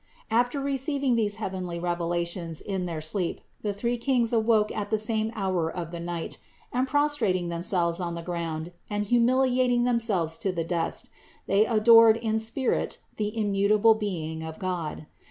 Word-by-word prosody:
555. 235 +2 +4
After 245 +4 -5
receiving 275 -1 0
these 210 -3 +1
heavenly 185 -5 -4
revelations 170 -1 -2
in 190 -3 -3
their 165 -2 -4
sleep, 170 +3 -2 0.2
the 210 - -1
three 235 +4 -1
Kings 240 -1 +1
awoke 220 -2 +3
at 205 -1 -3
the 220 - +2
same 220 0 0
hour 185 -5 0
of 170 -2 -5
the 170 - -6
night, 170 -1 -5 0.3
and 255 +2 +1
prostrating 255 -12 +1
themselves 170 0 0
on 170 -2 -3
the 170 - -6
ground 165 -1 -4 0.2
and 205 0 -1
humiliating 245 +1 +3
themselves 215 -10 +1
to 195 - 0
the 170 -2 -2
dust, 170 0 -2 0.3
they 205 +3 +3
adored 230 0 +7
in 220 -1 0
spirit 225 +4 0 0.2
the 210 +1 -2
immutable 210 +1 +4
being 170 -7 -4
of 160 0 -7
God. 175 -5 -4
205 Hz, 160 wpm, -27 LUFS, 175-230 Hz, 0.3 s, adored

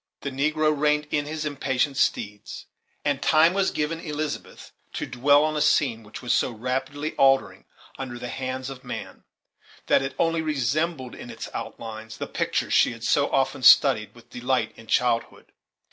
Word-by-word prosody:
The 140 - -4
negro 155 +3 +1
reined 150 +1 +1
in 145 -1 0
his 155 0 -4
impatient 140 -1 -1
steeds, 105 -5 -2 0.4
and 145 -1 0
time 160 +2 +5
was 195 0 +2
given 155 +2 -2
Elizabeth 150 -2 -5 0.2
to - - -3
dwell 145 +4 +3
on 155 0 0
a 150 - 0
scene 145 -6 +2
which 110 +3 -11
was 125 - +1
so - - +2
rapidly 135 +6 -3
altering 135 0 +3 0.3
under 125 -2 -5
the 125 0 -6
hands 130 0 -4
of 130 -1 -10
man, - - -7 0.6
that - - +4
it 135 0 -4
only 165 -1 +1
resembled 150 -1 -1
in - - -10
its - - -7
outlines 110 0 -7
the - - -4
picture - - -2
she - - +4
had 115 0 -12
so 140 +4 +2
often 135 0 0
studied 115 -6 +6
with 120 0 -18
delight 125 -2 -1
in 115 - -15
childhood. 115 0 0
135 Hz, 170 wpm, -25 LUFS, 125-150 Hz, 0.6 s, studied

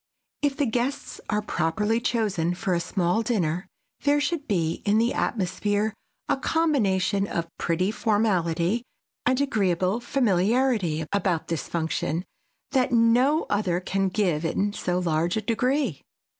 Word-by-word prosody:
If 285 -1 0
the 290 - +2
guests 245 +4 -2
are 210 0 0
properly 210 +6 0
chosen 200 -8 0
for 190 0 -1
a 170 - +2
small 180 +4 0
dinner 180 -7 -1 0.3
there 290 0 +3
should 290 0 -2
be 170 -6 0
in 205 +1 +3
the 230 +2 +2
atmosphere 205 +1 0 0.3
a - - +1
combination 200 - +1
of 165 -3 -4
pretty 180 +4 0
formality 205 -3 +1 0.5
and 255 +1 +3
agreeable 195 -6 +1
familiarity 215 - +1
about 180 -5 0
this 165 -2 -2
function 165 +1 -2 0.5
that 260 -3 +2
no 245 +6 +4
other 195 -4 0
can 195 +1 0
give 180 -6 0
in 195 +5 0
so 180 -3 -1
large 170 +1 0
a - - 0
degree. 250 - 0
205 Hz, 135 wpm, -25 LUFS, 175-235 Hz, 0.5 s, no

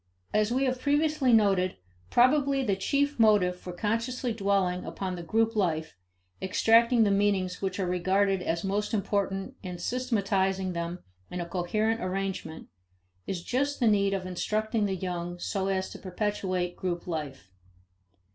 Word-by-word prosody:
As 215 +1 +2
we 260 +2 +1
have 255 -1 -1
previously 290 -2 +2
noted, 195 -5 +3 0.3
probably 275 +2 +3
the 200 -6 +1
chief 280 +8 0
motive 205 -5 +4
for 180 - -7
consciously 230 +6 -1
dwelling 195 -4 0
upon 185 -2 -4
the 175 - -6
group 225 +6 +1
life, 160 - 0 0.5
extracting 230 +5 +4
the 205 - +3
meanings 195 -2 +1
which 190 0 -2
are 190 - +1
regarded 190 +2 +1
as 170 -1 -2
most 205 +3 -1
important 195 -1 -1
and 180 -2 -6
systematizing 195 -5 0
them 170 +1 -4 0.3
in 180 - -5
a 175 - -2
coherent 215 +6 -1
arrangement, 185 -3 -4 0.6
is 175 -3 -3
just 280 +6 -1
the 245 - +2
need 200 -2 +3
of 185 -1 -4
instructing 215 +4 -1
the 190 - -1
young 175 -1 -4
so 195 +2 -2
as 190 -1 -1
to - - -9
perpetuate 185 -2 -2
group 175 -2 -3
life. 145 - -5
195 Hz, 150 wpm, -28 LUFS, 180-225 Hz, 0.6 s, motive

